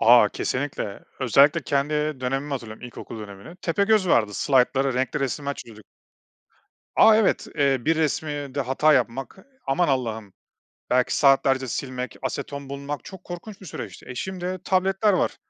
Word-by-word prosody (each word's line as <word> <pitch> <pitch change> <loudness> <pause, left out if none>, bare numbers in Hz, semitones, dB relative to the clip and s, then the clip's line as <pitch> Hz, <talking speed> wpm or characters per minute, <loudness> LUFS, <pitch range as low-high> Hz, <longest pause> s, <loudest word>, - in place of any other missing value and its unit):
A! 115 -2 +7
Kesinlikle. 125 -7 -3 0.2
Özellikle 135 +4 +4
kendi 145 +1 0 0.3
dönemimi 135 +3 -2
hatırlıyorum, 115 -5 -6
ilkokul 120 -1 -9
dönemini. 100 - -10
Tepegöz 200 +2 +2
vardı, 105 -7 +3
slaytlara 135 -1 +2
renkli 130 +3 -1
resimler 140 +1 -2
çiziyorduk. 110 -5 -12 1.1
A! 220 - +8
Evet, 220 -2 +2
eee, 140 -2 +3
bir 160 0 +2
resimde 145 -2 -1
hata 135 +4 +3
yapmak, 130 +2 0 0.3
aman 140 +6 +2
Allah'ım 110 -7 -2 0.6
belki 125 0 +2
saatlerce 135 -2 +3
silmek, 125 0 -4
aseton 140 0 -4
bulmak 140 -1 -5
çok 190 -2 -11
korkunç 185 +4 -8
bir 190 - -11
süreçti. - - -8
E, 125 - -6
şimdi 185 +5 -4
tabletler 195 +2 +2
var. 185 - +1
140 Hz, 140 wpm, -24 LUFS, 125-160 Hz, 1.1 s, A